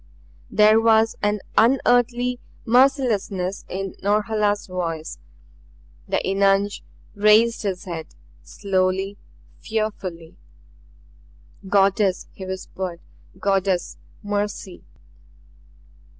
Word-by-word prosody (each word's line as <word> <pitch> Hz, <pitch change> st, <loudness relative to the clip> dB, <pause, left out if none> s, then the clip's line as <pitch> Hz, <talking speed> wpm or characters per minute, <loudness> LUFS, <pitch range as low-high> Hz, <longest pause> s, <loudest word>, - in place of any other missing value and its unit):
There 215 Hz, +1 st, +5 dB
was 225 Hz, 0 st, +4 dB
an 205 Hz, 0 st, 0 dB
unearthly 245 Hz, 0 st, +3 dB, 0.3 s
mercilessness 230 Hz, -7 st, +1 dB
in 195 Hz, +1 st, -4 dB
Norhala's 205 Hz, 0 st, +1 dB
voice. 165 Hz, -, -4 dB, 0.9 s
The 195 Hz, -, 0 dB
eunuch 195 Hz, +1 st, +2 dB, 0.3 s
raised 215 Hz, +3 st, +4 dB
his 195 Hz, -4 st, -3 dB
head; 165 Hz, -3 st, -6 dB, 0.3 s
slowly, 195 Hz, 0 st, -1 dB, 0.4 s
fearfully. 195 Hz, -7 st, -4 dB, 1.3 s
"Goddess!" 195 Hz, -1 st, +2 dB
he 190 Hz, -, -8 dB
whispered. 185 Hz, -2 st, -5 dB, 0.4 s
"Goddess! 195 Hz, -2 st, 0 dB, 0.3 s
Mercy!" 205 Hz, -2 st, -3 dB
200 Hz, 75 wpm, -22 LUFS, 190-220 Hz, 1.3 s, There